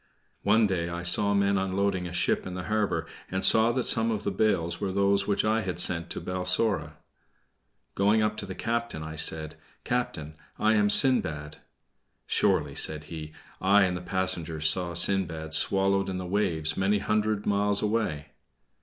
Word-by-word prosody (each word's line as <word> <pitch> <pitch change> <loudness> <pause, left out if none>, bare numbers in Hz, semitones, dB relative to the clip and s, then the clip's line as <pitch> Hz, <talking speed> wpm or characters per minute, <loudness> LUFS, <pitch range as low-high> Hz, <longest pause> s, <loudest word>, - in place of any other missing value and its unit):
One 110 +2 +3
day 90 -4 -2
I 85 0 -5
saw 100 +4 +2
men 100 0 +2
unloading 95 -1 -1
a - - -8
ship 90 - 0
in 90 - -6
the 90 - -5
harbor, 105 0 -1 0.2
and 95 0 0
saw 110 +1 +5
that 130 0 -1
some 115 0 +3
of 110 -3 -2
the 100 - -2
bales 95 -5 0
were 95 - -2
those 100 +1 +1
which 100 0 0
I 110 +1 +1
had 95 -4 -4
sent 85 -1 +1
to - - -5
Balsora. 90 -2 -1 1.0
Going 105 +2 +2
up 105 0 -1
to - - -6
the 95 - -7
captain, 115 -8 -3
I 80 0 -7
said: 80 0 0 0.3
"Captain, 80 -11 -3 0.2
I 110 +1 +2
am 105 -1 +2
Sindbad." 80 - +3 0.7
"Surely," - - +1
said 75 -1 -3
he, 75 -1 -7 0.3
"I 100 +1 +4
and 90 -1 0
the 90 - -5
passengers 90 -4 -2
saw 85 0 +1
Sindbad 85 -3 +2
swallowed 95 +2 +2
in 95 - -4
the 90 - -5
waves 90 -5 -1
many 95 +2 +1
hundred 105 0 -1
miles 100 0 +1
away." 105 -9 -2
95 Hz, 170 wpm, -27 LUFS, 85-105 Hz, 1.0 s, saw